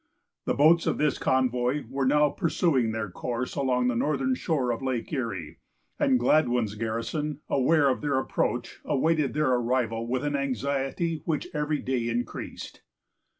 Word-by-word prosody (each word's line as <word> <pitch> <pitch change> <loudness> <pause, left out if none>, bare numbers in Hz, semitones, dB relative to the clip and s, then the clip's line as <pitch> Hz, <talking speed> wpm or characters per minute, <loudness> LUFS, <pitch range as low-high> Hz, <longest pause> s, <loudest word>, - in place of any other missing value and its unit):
The - - 0
boats 160 +4 +5
of - - +1
this 150 -1 +1
convoy 130 +2 +1
were 135 +2 -1
now 150 +2 +4
pursuing 145 - +1
their 110 -3 -3
course 125 +5 -3
along 125 -3 +1
the 125 - +1
northern 135 0 +1
shore 130 -2 0
of 115 - -3
Lake 130 +1 -3
Erie; 95 - -4 0.4
and 130 - +3
Gladwyn's 120 -5 +2
garrison, 115 +7 -3
aware 145 +2 +3
of 130 - +1
their 145 -3 0
approach, 130 - -2
awaited 155 -1 +1
their 150 -3 +2
arrival 120 -2 0
with 130 +2 -1
an 145 -1 -1
anxiety 140 - -1
which 155 -3 -2
every 150 0 0
day 125 -3 -1
increased. 120 0 -5
130 Hz, 150 wpm, -27 LUFS, 120-150 Hz, 0.4 s, boats